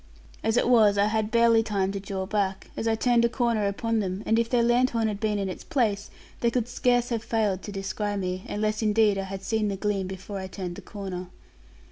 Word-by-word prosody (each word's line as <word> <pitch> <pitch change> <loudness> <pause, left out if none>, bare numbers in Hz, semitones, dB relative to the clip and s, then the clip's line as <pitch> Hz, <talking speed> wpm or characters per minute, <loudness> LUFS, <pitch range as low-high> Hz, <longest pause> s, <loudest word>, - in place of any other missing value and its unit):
As 225 +1 +1
it - - +3
was, 220 -5 +5
I 200 - +4
had 215 0 0
barely 230 0 +5
time 200 -3 -1
to 200 - -4
draw 195 -1 -4
back, 195 -1 -2
as 225 - -2
I 225 - +3
turned 235 +1 +3
a 235 - +4
corner 235 -4 +1
upon 225 +3 -1
them; 190 0 -3
and 225 +1 +3
if 230 0 0
their 240 -1 +3
lanthorn 240 -1 +2
had 205 -2 -3
been 215 -1 0
in 195 -1 -1
its 185 - -6
place, 220 -9 0 0.3
they 235 - +2
could 235 -1 -1
scarce 245 0 +1
have 230 -2 -2
failed 210 -5 0
to 205 - -7
descry 205 +1 -3
me, 185 -1 -3
unless 215 +1 -1
indeed 215 -2 +3
I 195 - -3
had 190 0 -7
seen 220 +1 0
the 200 - -1
gleam 200 -2 -1
before 190 +1 -6
I 190 - -5
turned 185 -2 -6
the - - -8
corner. 190 -3 -6
210 Hz, 230 wpm, -26 LUFS, 195-230 Hz, 0.3 s, was